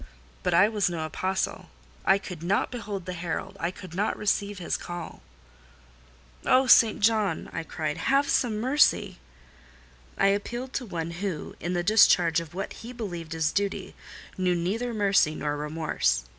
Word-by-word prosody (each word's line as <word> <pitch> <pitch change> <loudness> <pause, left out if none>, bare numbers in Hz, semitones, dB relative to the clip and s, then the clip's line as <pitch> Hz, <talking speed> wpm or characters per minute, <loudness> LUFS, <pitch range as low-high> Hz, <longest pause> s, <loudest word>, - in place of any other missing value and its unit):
But - - +1
I 185 +4 +6
was 210 -4 +1
no 165 -2 -3
apostle,—I 190 +2 -2
could 180 -4 -8
not 185 +4 0
behold 210 -7 -5
the 180 - -4
herald,—I 170 0 -3
could 185 -2 -10
not 200 +4 -1
receive 205 -1 0
his 180 - -2
call. 175 -1 -7 1.2
"Oh, 260 +1 +4
St. 230 -4 +6
John!" 210 -5 +1
I - - -2
cried, 155 -2 -4
"have 275 +1 +2
some 225 -6 +1
mercy!" 260 - +2 1.0
I 195 - +4
appealed 240 +6 -2
to 250 - -3
one 170 -3 -4
who, 175 -2 -4
in 175 +2 -3
the 175 -1 0
discharge 175 -5 +5
of 165 0 -9
what 195 - -4
he 235 - -8
believed 175 -9 -6
his 160 -1 0
duty, 200 -1 -2 0.5
knew 180 -1 +2
neither 210 +8 -1
mercy 200 -7 +2
nor 145 -1 -2
remorse. 150 - 0
185 Hz, 155 wpm, -27 LUFS, 165-215 Hz, 1.2 s, I